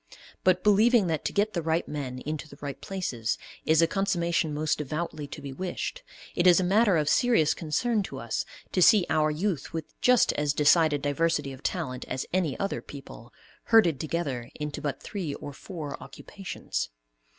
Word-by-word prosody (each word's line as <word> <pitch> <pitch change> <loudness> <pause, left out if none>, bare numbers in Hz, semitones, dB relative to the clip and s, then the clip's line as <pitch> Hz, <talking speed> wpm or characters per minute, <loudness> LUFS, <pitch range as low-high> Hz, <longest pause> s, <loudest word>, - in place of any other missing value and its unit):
But, 185 0 +3
believing 215 +2 +5
that 160 -3 -1
to - - 0
get 210 +1 +1
the 170 - -1
right 165 +1 0
men 135 -4 -4
into 155 +1 -4
the - - -13
right 140 -1 -6
places 130 - -2 0.3
is 160 +1 +5
a - - +4
"consummation 170 -4 0
most 150 +1 0
devoutly 150 0 -4
to 145 0 -9
be 140 -1 -6
wished," 185 - -4 0.3
it 175 - +2
is 175 0 +7
a - - +1
matter 200 0 +4
of 150 -1 0
serious 230 - +3
concern 210 +8 0
to - - -7
us - - -2 0.3
to 185 - +1
see 200 0 +7
our 155 0 +3
youth 165 +1 -2
with 160 -1 -5
just 250 -1 +4
as 150 -1 0
decided 150 0 +4
diversity 145 -1 0
of 130 - -12
talent 145 -9 -3
as 130 +1 -3
any 175 -7 0
other 195 - -2
people, 130 -4 -11 0.3
herded 180 - +5
together 145 -7 -3
into 150 -1 -5
but 140 -3 -3
three 175 -8 -4
or 145 - -8
four 150 -2 -7
occupations. 185 - -5
160 Hz, 180 wpm, -27 LUFS, 145-185 Hz, 0.3 s, is